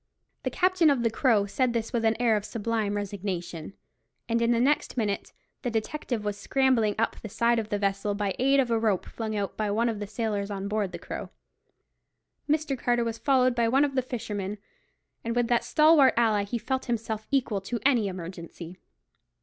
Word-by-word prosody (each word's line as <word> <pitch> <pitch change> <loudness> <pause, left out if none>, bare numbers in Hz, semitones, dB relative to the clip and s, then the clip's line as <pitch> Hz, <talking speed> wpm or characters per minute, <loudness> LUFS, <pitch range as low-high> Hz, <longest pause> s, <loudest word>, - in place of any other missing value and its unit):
The - - -1
captain 365 -3 +3
of 270 -4 +2
the 230 - +2
Crow 220 -4 +3
said 245 +4 0
this 230 0 -2
with 235 -2 0
an 225 0 +2
air 235 -3 +3
of 210 - -1
sublime 220 -2 -2
resignation; 190 -4 -4 0.5
and 230 0 +1
in 235 - +2
the 235 -1 +3
next 275 +1 +1
minute 205 -4 -1 0.3
the 245 - -2
detective 225 0 -3
was 205 -1 -2
scrambling 250 -3 +2
up 225 - 0
the 215 - -7
side 235 +3 +2
of 215 -1 -4
the 205 - 0
vessel, 200 0 -1
by 205 -1 -1
the - - -5
aid 275 +1 +4
of 250 -3 +1
a 230 - +2
rope 215 -5 +1
flung 220 -2 -5
out 200 -1 -2
by 215 -1 -1
one 230 +3 +1
of 220 -3 -3
the 205 - -4
sailors 210 -1 -2
on 200 -1 -4
board 205 -2 -1
the - - -6
Crow. - - -7 1.2
Mr. 305 -2 +1
Carter 240 -1 +1
was 230 -1 -3
followed 255 -2 +3
by 235 -1 +1
one 270 +5 +4
of 280 - -3
the 260 - +2
fishermen; 210 -5 -4 0.7
and 230 +1 -2
with 240 -1 +1
that 240 -1 +2
stalwart 305 -3 +5
ally 215 -4 +3
he 235 +4 -3
felt 260 +4 -2
himself 220 -2 -3
equal 240 -7 0
to 235 +5 -4
any 245 -7 +4
emergency. 175 -1 -8
225 Hz, 205 wpm, -27 LUFS, 205-245 Hz, 1.2 s, stalwart